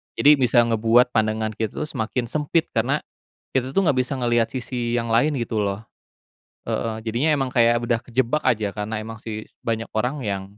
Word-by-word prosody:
jadi 145 0 +6
bisa 120 -1 +4
ngebuat 115 +2 +3
pandangan 110 -1 0
kita 110 -2 -3
tuh - - -4
semakin 120 +1 -2
sempit 155 +3 0
karena - - 0 0.5
kita 130 0 0
tuh 195 +8 +2
nggak 145 - +4
bisa 130 +2 -4
ngeliat 120 -2 +2
sisi 120 -2 -2
yang 115 - -2
lain 140 +5 +3
gitu 115 -2 -1
loh. 100 +2 -3 0.8
Heeh. 110 -1 -2
Jadinya 120 +8 +1
emang 135 -2 -1
kayak 120 -1 +3
udah 120 -1 +1
kejebak 125 +4 0
aja 110 -5 +1
karena 105 +3 -4
emang 110 +1 -8
sih 110 -1 -6 0.2
banyak 115 -1 -3
orang 125 +6 -1
yang 100 -3 -2
120 Hz, 180 wpm, -23 LUFS, 110-130 Hz, 0.8 s, jadi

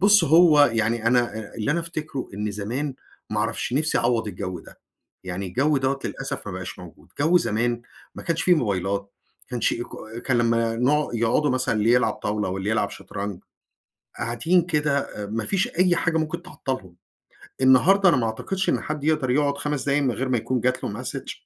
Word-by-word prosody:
بُص 205 +2 +6
هو 155 -3 +6
يعني 115 0 0
أنا 120 -2 +2
أ 110 -2 -9
اللي 115 +6 -1
أنا 170 - +1
أفتكره، 155 -5 -5
إن 105 +1 -2
زمان 120 +8 -3 0.4
ما - - -1
اعرفش - - -2
نفسي 150 +4 +1
أعوّض 115 -2 +1
الجو 90 -1 -5
ده، - - -16 0.5
يعني 95 +1 -4
الجو 140 +10 +1
دَوّة- 135 +1 0
للأسف- 135 -4 -4
ما 100 - -4
بقاش 90 0 -6
موجود! 85 -3 -13
جو 165 +4 +4
زمان، 120 -4 -1 0.3
ما - - -8
كانش 165 -1 -1
في 180 - +5
موبايلات 100 - 0 0.4
ما - - -20
كانش 120 -3 +1
إيكو 120 - -5
أ 110 +2 -8
كان 125 0 0
لمّا 115 -1 +1
نقع 145 +5 +2
يقعدوا 115 +6 +2
مثلًا، 130 -1 0
اللي 105 +2 +2
يلعب 125 - +3
طاولة 105 -1 -2
واللي 95 +3 -2
يلعب 105 -2 +1
شَطرنج، 100 -2 -6 0.7
قاعدين 120 +10 +2
كده 150 -4 +1 0.3
أ - - -3
ما 110 +2 -3
فيش 195 -2 +1
أي 180 0 +2
حاجة 160 -1 +1
ممكن 155 +2 -2
تعطّلهم. 130 - -6 0.7
النهارده 180 +10 +6
أنا 170 - +4
ما 115 - +1
اعتقدش 190 +12 -2
إن - - +2
حد 150 -1 -4
يقدَر 150 -4 +1
يقعُد 140 +1 +1
5 145 -3 -2
دقايق 140 +1 +2
من 130 - +2
غير 130 +3 -3
ما 125 - +2
يكون 125 +3 -1
جات 125 +1 0
له - - -4
Message - - -6
125 Hz, 195 wpm, -24 LUFS, 110-150 Hz, 0.7 s, بُص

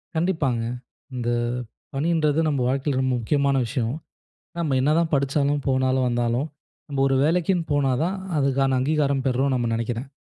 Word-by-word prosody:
கண்டிப்பாங்க. 160 -8 0 0.5
இந்த 120 -1 -2 0.6
பணின்றது 155 +1 +1
நம்ம 145 -3 0
வாழ்க்கையில 135 0 0
ரொம்ப 130 -1 +1
முக்கியமான 140 +3 +1
விஷயம். 115 +1 -2 0.7
நம்ம 150 -6 0
என்னதான் 160 +4 +2
படிச்சாலும், 140 +1 +1
போனாலும் 130 -1 +2
வந்தாலும், 120 +3 0 0.4
நம்ம 140 -2 -1
ஒரு 135 - +2
வேலைக்கின்னு 170 +1 +1
போனா 140 -2 +2
தான், 185 +3 -1 0.2
அதுக்கான 135 -1 +2
அங்கீகாரம் 140 -1 +1
பெறுறோம் 130 +1 +1
நம்ம 120 -2 0
நினைக்கிறேன். 115 +3 -3
135 Hz, 135 wpm, -24 LUFS, 130-150 Hz, 0.7 s, என்னதான்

